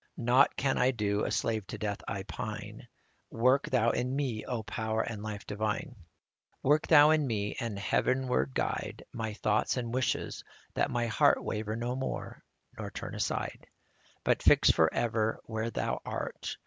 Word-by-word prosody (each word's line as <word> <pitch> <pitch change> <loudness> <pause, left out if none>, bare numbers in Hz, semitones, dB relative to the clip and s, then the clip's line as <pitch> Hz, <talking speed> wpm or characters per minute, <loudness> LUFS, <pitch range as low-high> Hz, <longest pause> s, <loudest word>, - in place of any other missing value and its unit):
Nought 125 +3 +4
can 135 0 +1
I 125 - +4
do, 105 -4 0
a - - -2
slave 110 -3 -1
to - - -6
death 105 -2 -3
I 95 - -3
pine: 110 +1 -6 0.4
Work 130 +4 +2
Thou 120 -2 +3
in 125 +2 -1
me, 130 -6 -1
O 120 -3 -3
Power 110 0 -1
and 110 -3 -5
Life 105 -1 -6
divine! 105 +8 -2
55 110 - -18 0.6
Work 145 +3 +3
Thou 150 +1 +8
in 155 -3 +3
me, 105 -3 -2
and 115 -4 -3
heavenward 115 - +1
guide - - -2
My 110 -2 -3
thoughts 110 +4 +1
and 120 -2 -3
wishes, 130 0 -1 0.3
that - - +1
my 120 -1 0
heart 110 -2 +3
Waver 110 0 -3
no 120 +2 -2
more, 130 0 -4 0.4
nor - - -4
turn - - -6
aside, - - -3 0.6
But - - +2
fix - - +6
forever 110 +6 +1
where 110 0 -2
Thou - - -2
art. - - -4
115 Hz, 165 wpm, -30 LUFS, 105-125 Hz, 0.6 s, Thou